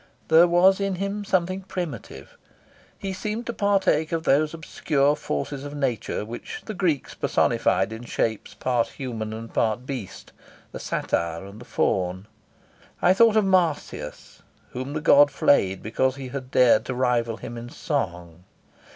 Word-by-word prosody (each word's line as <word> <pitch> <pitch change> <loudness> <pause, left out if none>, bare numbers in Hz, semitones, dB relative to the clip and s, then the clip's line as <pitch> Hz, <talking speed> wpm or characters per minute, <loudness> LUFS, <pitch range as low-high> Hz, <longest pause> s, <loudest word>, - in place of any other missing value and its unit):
There 165 +2 +7
was 185 +3 +5
in 195 -1 -1
him 200 +2 -3
something 185 -1 0
primitive. 175 - -7 0.6
He 195 -1 -4
seemed 215 +4 -4
to 235 - -3
partake 195 -7 +2
of 165 -1 -1
those 150 +2 +3
obscure 150 -3 0
forces 135 - -4
of 145 0 -7
nature 120 -7 -2
which 120 +2 -7
the 215 - -5
Greeks 175 -8 -1
personified 95 +3 +1
in 115 +2 -8
shapes 110 -2 -2
part 120 -2 0
human 115 -4 -5
and 115 +1 -8
part 110 +2 0
beast, 130 -8 -7 0.4
the - - -7
satyr 85 +2 -2
and 100 +3 -11
the - - -11
faun. 95 -2 -1 0.7
I 180 - +5
thought 225 +2 +5
of 215 - +4
Marsyas, 165 - -1 0.3
whom 130 +3 -5
the 155 - -3
god 145 -1 +6
flayed 95 -9 +2
because 130 +4 0
he 135 -2 -7
had 130 -1 -6
dared 125 -4 +5
to 130 - -3
rival 120 -3 +1
him 120 - -8
in 120 +1 -7
song. 90 - -4
135 Hz, 155 wpm, -24 LUFS, 115-175 Hz, 0.7 s, There